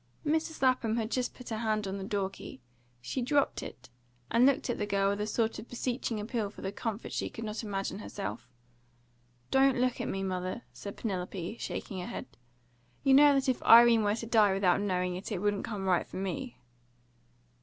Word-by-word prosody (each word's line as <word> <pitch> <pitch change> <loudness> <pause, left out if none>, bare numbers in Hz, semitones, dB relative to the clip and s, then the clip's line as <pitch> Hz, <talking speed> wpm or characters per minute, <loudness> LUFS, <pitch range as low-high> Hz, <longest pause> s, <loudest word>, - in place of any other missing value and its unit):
Mrs. 315 0 -1
Lapham 250 -3 +2
had 225 0 -2 0.2
put 250 - -10
her 220 - -2
hand 215 -2 0
on 195 +1 -4
the - - -5
door 195 -1 -1
key; 130 - -10 0.4
she 190 - -3
dropped 280 +3 +1
it, 125 -1 -10 0.4
and 235 +3 +5
looked 275 -1 +2
at 240 - -2
the 205 - -1
girl 195 -1 +2
with 200 +1 -2
a 210 - -1
sort 225 0 0
of 220 - -10
beseeching 245 -2 -2
appeal 215 0 -2
for 205 - -12
the 195 - -2
comfort 225 +1 -4
she - - -2
could 225 - -8
not 215 0 -4
imagine 195 -2 -3
herself. 105 - -6 1.0
"Don't 270 -1 +4
look 250 -1 +1
at - - -3
me, 195 0 -2
mother," 185 +4 -3
said 200 - -8
Penelope, 185 -1 -4
shaking 190 - -5
her 180 - -5
head. - - -5 0.8
"You 270 - +5
know 290 +1 +7
that 270 0 +1
if 260 - +1
Irene 230 0 +8
were 205 0 +1
to 230 - -5
die 215 -4 +4
without 195 0 +3
knowing 180 -2 0
it, 185 +4 -6
it 205 - -1
wouldn't 205 +1 0
come 205 -4 -4
right 180 -2 +2
for - - -8
me." 195 +7 -4
215 Hz, 200 wpm, -30 LUFS, 195-240 Hz, 1.0 s, Irene